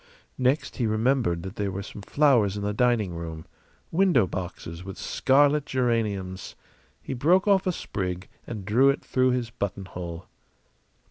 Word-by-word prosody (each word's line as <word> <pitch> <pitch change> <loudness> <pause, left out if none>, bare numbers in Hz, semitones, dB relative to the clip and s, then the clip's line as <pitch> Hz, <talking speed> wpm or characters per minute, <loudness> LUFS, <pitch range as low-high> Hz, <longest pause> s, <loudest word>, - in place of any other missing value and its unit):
Next, 130 +4 +1
he 120 - +1
remembered 110 -5 +1
that 95 +2 -7
there 100 -1 -1
were 95 +1 -4
some 105 - -9
flowers 115 -5 +3
in 100 - -4
the 105 0 -1
dining 115 -5 +2
room 80 -1 -6 0.5
window 170 - +4
boxes 90 -2 -6
with 95 -1 -8
scarlet 145 +2 +3
geraniums. 105 -7 -1 0.5
He - - -4
broke 175 +10 +3
off 195 -2 +4
a - - +3
sprig 90 - -4 0.2
and 105 -5 -6
drew 125 +7 +4
it 140 - -1
through 130 0 +2
his 125 -2 -1
buttonhole. 90 -5 -5
110 Hz, 150 wpm, -26 LUFS, 95-130 Hz, 0.5 s, window